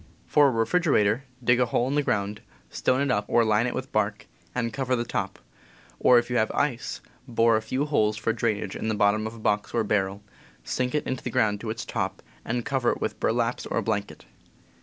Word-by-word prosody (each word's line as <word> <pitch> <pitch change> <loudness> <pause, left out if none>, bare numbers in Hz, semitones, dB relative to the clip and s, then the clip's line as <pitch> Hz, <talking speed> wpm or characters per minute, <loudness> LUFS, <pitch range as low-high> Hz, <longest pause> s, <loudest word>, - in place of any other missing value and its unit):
For 145 -1 +5
a - - +4
refrigerator, 120 - +2 0.2
dig 120 +1 +4
a 125 - +3
hole 120 +2 +1
in 135 - -1
the 150 - +3
ground, 105 -5 -1 0.3
stone 130 +1 +1
it 140 -2 +1
up 105 -3 +1
or 120 -1 +3
line 110 +2 +2
it 125 - -3
with 130 +1 -5
bark, 105 0 0 0.3
and 115 -2 -1
cover 130 -2 0
the 120 - -1
top; - - -3 0.6
or, 125 - +6
if 120 0 +2
you 125 0 -1
C - - +5
Id 110 - +1
St - - -7
have - - +4
ice, 140 -5 -1 0.3
bore 115 -1 +3
a 110 - +1
few 130 +6 -1
holes 110 -8 +1
for 115 - 0
drainage 110 -4 -1
in - - -4
the 110 - 0
bottom 105 +1 +2
of 110 - -8
a - - -11
box 105 0 0
or 115 - +2
barrel, 100 -1 -1 0.4
sink 125 +2 -1
it 150 - 0
in 130 - -2
the 125 - -5
ground 105 -3 +1
to 115 - -5
its 115 +1 -4
top, - - -3 0.2
and 120 +1 -2
cover 130 -3 +1
with - - -3
burlaps 115 +1 0
or - - -2
a 115 - +1
blanket. 100 -1 -3
115 Hz, 235 wpm, -26 LUFS, 110-125 Hz, 0.6 s, or